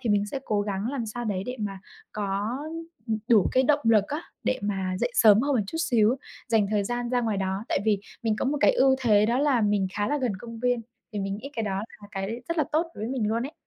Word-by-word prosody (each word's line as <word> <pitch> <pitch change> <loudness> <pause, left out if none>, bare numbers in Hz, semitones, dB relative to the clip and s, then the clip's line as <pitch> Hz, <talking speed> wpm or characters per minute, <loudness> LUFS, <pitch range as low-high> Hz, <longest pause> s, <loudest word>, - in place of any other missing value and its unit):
thì 235 -4 -1
mình 205 0 +2
sẽ 265 +6 -4
cố 210 -2 +1
gắng 205 +1 -2
làm 255 -5 -3
sao 240 +3 -5
đấy 195 -3 -1
để 250 +1 -4
mà 195 -2 -3 0.3
có, 205 +4 -2 0.5
ừm, 220 -1 0
đủ 215 -6 +5
cái 260 - +4
động 290 +2 +3
lực 220 -3 +5
á, 300 +4 -3 0.2
để 255 - +1
mà 190 -2 -1
dậy - - +1
sớm 215 - +7
hơn 280 +2 +1
một 215 - +2
chút 325 - -5
xíu, 240 -5 +3 0.3
dành 220 -3 +3
thời 205 -2 +1
gian 240 +2 -2
ra 250 -1 +2
ngoài 220 -4 0
đó 190 +2 -2
tại - - +1
vì 210 -2 +3 0.2
mình 220 -2 +1
có - - -1
một 285 +2 0
cái - - +6
ưu 270 - +4
thế 210 -4 +4
đó 235 +3 +1
là 275 -4 +3
mình 205 -2 +2
khá 205 0 0
là 295 - +1
gần 250 -5 0
công 230 +2 -9
viên. 245 -1 +1 0.3
Thì 210 - -3
mình 195 +1 -2
nghĩ 275 +6 -8
cái 225 - -2
đó 195 -2 -1 0.3
là 205 - -11
cái 205 +5 -4
rất 335 -1 -1
là 305 - +3
tốt 315 +2 +3
đối 215 - -5
với - - -3
mình 230 -5 0
luôn 230 +2 0
ấy. 295 - -10
220 Hz, 270 wpm, -26 LUFS, 205-255 Hz, 0.5 s, sớm